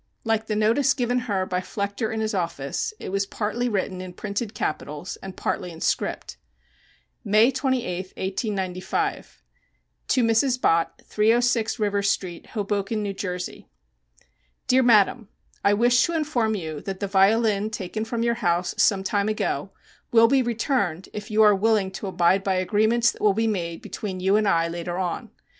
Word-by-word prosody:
Like 225 -1 0
the 215 - -1
notice 225 +6 +3
given 245 -1 0
her 190 -2 0
by 180 -1 -1
Flechter 200 +3 -3
in 220 0 -2
his 215 0 -1
office, 170 - -2
it - - -6
was 195 +1 -1
partly 235 +5 -2
written 190 -3 -2
in 185 -1 -8
printed 205 +3 -4
capitals 150 -1 -4
and 190 -1 -9
partly 180 - -2
in 165 -1 -10
script. - - -2 0.9
May 215 +3 +4
28, 250 -9 -1
1895. 190 -2 -3 0.6
To 255 - +2
MRS. 235 +3 +2
BOTT, 165 -7 +1
306 230 +1 +2
River 205 -2 0
Street, 185 -3 -2
Hoboken, 205 0 -2
N. 200 -1 -3
J. 180 -2 -5 1.0
Dear 260 +1 +4
Madam: 225 -2 +4 0.4
I 205 - +4
wish 240 +3 +4
to 340 - -2
inform 250 -9 0
you 160 -6 -5
that 195 -1 -5
the 200 - -1
violin 205 +2 +3
taken 215 0 -4
from 230 +1 -2
your 235 0 +2
house 175 -1 +1
some 195 -2 +3
time 200 +2 0
ago 215 - -2 0.4
will 230 -1 +6
be 270 +2 +3
returned 225 - -1
if 210 0 -6
you 215 0 +4
are 210 -1 +7
willing 205 -1 +2
to 195 - -6
abide 185 +1 +2
by 195 -1 +1
agreements 220 +5 +2
that - - -15
will 205 -2 +3
be 225 +1 +1
made 170 -6 -2
between 190 -3 -5
you 190 +2 +2
and 215 -1 +2
I 165 -3 +3
later 175 +1 -4
on. 180 -2 -3
205 Hz, 165 wpm, -24 LUFS, 185-225 Hz, 1.0 s, are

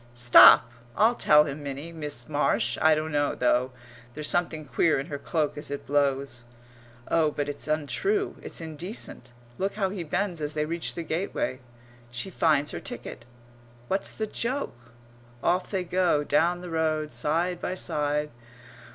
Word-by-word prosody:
Stop! 120 -1 +8 0.3
I'll 225 +3 +5
tell 150 -9 +5
him 150 0 -6
Minnie! 140 +3 -6
Miss 150 -6 -4
Marsh! 120 -6 +1
I 160 0 +6
don't 155 +1 -3
know 145 -1 0
though. 125 +1 +1 0.4
There's 150 -1 -3
something 170 -3 0
queer 145 +4 +2
in 135 - -4
her 140 - -3
cloak 150 -1 -1
as 150 - -7
it 140 0 -5
blows. 140 -3 0 0.6
Oh, 160 -2 +3
but 145 -1 -3
it's 145 +1 -6
untrue, 385 - 0
it's - - -7
indecent.... 160 - -6 0.3
Look 195 +1 -1
how 195 -3 0
he 190 -3 -4
bends 175 +1 -2
as 150 +1 -3
they 150 0 0
reach 165 +1 -3
the 170 - -4
gateway. 160 -5 -2 0.5
She 120 +11 -5
finds 150 -4 +2
her 85 - -5
ticket. - - -8 0.6
What's 195 +1 0
the 220 - -3
joke? 230 - -4 0.5
Off 180 +1 +1
they 190 -3 -1
go, 180 -4 +1
down 170 +5 +2
the 180 -1 -8
road, 155 -2 -1
side 170 +3 0
by 185 - -2
side.... 150 -3 -1
155 Hz, 160 wpm, -27 LUFS, 145-175 Hz, 0.6 s, Stop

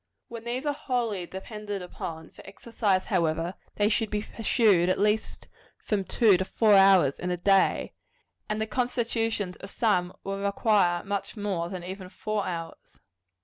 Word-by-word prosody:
When 230 -1 -8
these 250 +4 -3
are 290 - +1
wholly 235 -10 -2
depended 205 0 -6
upon 160 -2 -7
for - - -14
exercise, 200 -2 -1
however, 170 -2 0 0.2
they 205 - +2
should 220 0 0
be 210 0 -2
pursued 210 -6 +2
at 185 - +2
least 210 +2 0 0.3
from 200 -3 -2
two 215 -4 +4
to 190 - -1
four 215 +1 +3
hours 195 -8 +6
in 180 - -3
a 180 - -1
day; 195 +2 +2 0.6
and 215 0 -1
the 220 - 0
constitutions 225 -5 -1
of 195 - -10
some 185 -5 +1
will 195 0 -4
require 200 -3 +2
much 200 +3 -4
more 190 -5 -2
than 185 -2 -6
even 185 +1 -7
four 215 +1 -3
hours. 165 -2 -7
200 Hz, 160 wpm, -27 LUFS, 180-220 Hz, 0.6 s, hours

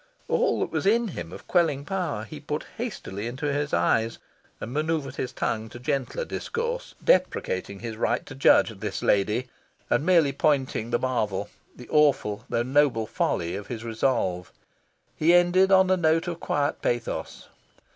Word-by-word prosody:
All 475 +1 +1
that - - -1
was - - -1
in 230 +2 +3
him 85 - -7
of - - -10
quelling 155 -6 +2
power 175 - -2
he 150 +6 -9
put 150 +1 -4
hastily 115 - -5
into 140 +4 -2
his 145 0 -1
eyes, 110 +7 +1 0.4
and 115 - -6
manoeuvred 155 -1 -1
his 125 - -3
tongue 110 0 -2
to 120 - -10
gentler 140 - -2
discourse, 480 +2 -4
deprecating 100 - +1
his 115 -2 -5
right - - 0
to - - -9
judge 135 -3 +4
"this 105 -2 -4
lady," 105 +5 +2 0.4
and - - +3
merely 165 -5 +4
pointing 135 -5 0
the 120 - +2
marvel, 105 -6 -1 0.3
the 125 - -12
awful 140 -9 +2
though 115 - +1
noble 130 -3 +2
folly, 85 -4 -1
of 100 0 -6
his 115 -2 -6
resolve. 110 -6 -1 0.6
He 170 +3 +4
ended 180 +2 +4
on 190 -1 +5
a 185 - +4
note 165 0 +2
of 170 -1 -4
quiet 145 0 -1
pathos. 120 -1 -3
140 Hz, 165 wpm, -26 LUFS, 110-170 Hz, 0.6 s, on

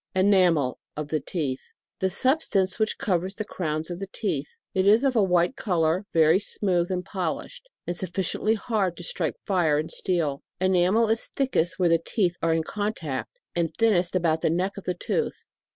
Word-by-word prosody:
ENAMEL, 185 -8 +3 0.2
(of 150 -1 -4
the 155 - 0
teeth.) 140 -3 -3 0.4
The 190 - +1
sub 260 - +2
stance 190 -6 0
which 215 0 +1
covers 185 0 -1
the 215 - -4
crowns 155 -3 -3
of 175 - -5
the 195 -1 -6
teeth. - - -2 0.2
It 190 +1 +2
is 220 +5 +6
of 270 -2 +2
a 220 - +5
white 180 +3 +2
colour, 175 0 0
very 160 +2 +5
smooth, 185 -3 0
and 180 -1 -2
polished, 190 - -4 0.2
and 175 - -3
suf 180 0 -5
ficiently 195 +4 0
hard 200 -5 -1
to 175 - -7
strike 165 -2 -1
fire 165 -6 +2
with 155 - -3
steel. 160 -7 -1 0.2
Enamel 185 +4 +3
is 225 0 +1
thickest 255 -11 0
where 180 -3 +3
the 165 0 +3
teeth 180 -6 0
are 165 - +2
in 165 - 0
contact, 160 - -4 0.2
and 170 -2 -1
thin 225 -1 +4
nest 175 0 +1
about 165 -3 +1
the - - +2
neck 180 +4 0
of 200 - -9
the 180 - -1
tooth. 460 - -2
180 Hz, 195 wpm, -26 LUFS, 165-200 Hz, 0.4 s, is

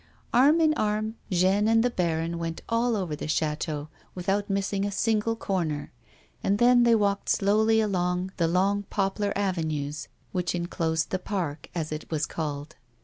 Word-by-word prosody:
Arm 280 +7 +5
in 315 -1 +4
arm 215 -4 -1 0.2
Jeanne 190 +3 +3
and 225 0 +4
the 245 - +1
baron 170 -3 -1
went 165 -1 -4
all 230 0 +1
over 180 -7 -2
the 150 - -6
ch§,teau 155 -1 -1 0.3
without 195 +3 -1
missing 195 0 0
a 205 - 0
single 220 +2 +1
corner, 170 -9 -2 0.5
and 200 - +2
then 245 +2 +5
they 235 -1 +5
walked 200 -2 0
slowly 220 +2 +3
along 180 -3 0
the 170 - +2
long 195 +4 +2
poplar 200 +1 0
avenues 155 -7 -2 0.2
which 180 -1 -1
enclosed 165 -2 -1
the 185 - 0
park, 175 -7 -4
as 160 -3 -3
it 155 0 -5
was 155 -2 0
called. 150 -1 -5
190 Hz, 160 wpm, -27 LUFS, 165-210 Hz, 0.5 s, Arm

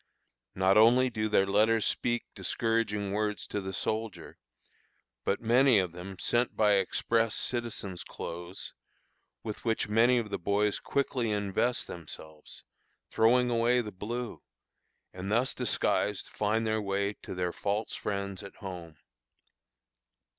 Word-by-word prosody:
Not 95 +2 +4
only 125 +3 +5
do 110 -1 -1
their 95 -2 +4
letters 110 +3 +3
speak 120 -1 0
discouraging 110 -3 0
words 105 0 -1
to 105 - -3
the 95 0 -5
soldier, 110 +3 -4 0.8
but 100 - 0
many 120 +2 +5
of 90 -3 +1
them 90 +2 -8
sent 120 +5 0
by 105 -1 +4
express 115 +3 +1
citizens' 110 -7 -2
clothes, 85 +3 -7 0.7
with 105 -2 -6
which 115 -2 0
many 115 +4 +4
of 110 -3 -2
the - - -2
boys 100 +3 +1
quickly 130 -4 -1
invest 105 +4 0
themselves, 80 -2 -9 0.5
throwing 120 +2 +4
away 120 +1 +3
the 110 -3 -3
blue, 115 +5 -5 0.7
and 95 +2 -5
thus 120 +4 +2
disguised 105 -2 0
find 110 +2 0
their 110 0 0
way 100 0 -1
to - - -7
their 90 -1 -1
false 105 +2 -2
friends 100 -1 -3
at 100 - -10
home. 90 -5 -8
105 Hz, 130 wpm, -30 LUFS, 100-115 Hz, 0.8 s, only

